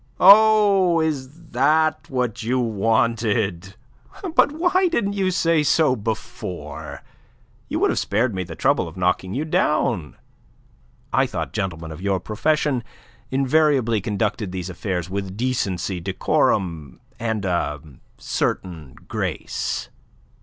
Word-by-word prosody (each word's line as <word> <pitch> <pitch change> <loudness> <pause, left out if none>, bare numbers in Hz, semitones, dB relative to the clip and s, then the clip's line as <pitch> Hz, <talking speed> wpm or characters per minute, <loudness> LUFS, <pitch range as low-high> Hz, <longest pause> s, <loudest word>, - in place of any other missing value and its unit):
"Oh, 200 -3 +6
is 150 -5 -1 0.2
that 155 +5 +2
what 125 -3 -2
you 125 +3 0
wanted? 110 -4 0 0.6
But 285 - +4
why 355 +4 +2
didn't 220 - 0
you 195 -2 0
say 165 -3 +2
so 150 -2 +3
before? 110 -1 -6 0.7
You - - -1
would - - +2
have - - 0
spared 110 +3 0
me 95 - -2
the 85 -2 -9
trouble - - +1
of 80 +3 -11
knocking 90 +1 0
you 150 +4 -1
down. 120 - 0 1.0
I - - +3
thought - - -4
gentlemen 80 -4 -3
of 80 - -9
your 95 -1 0
profession 140 +4 0 0.5
invariably 135 -4 +2
conducted 105 -1 -2
these 90 0 -5
affairs 90 -1 -3
with 95 0 -5
decency, 100 -7 -1
decorum, 85 -3 0 0.2
and 110 -3 -2
a 85 -5 -1 0.4
certain 80 -8 -3
grace. - - -3
115 Hz, 120 wpm, -22 LUFS, 95-155 Hz, 1.0 s, Oh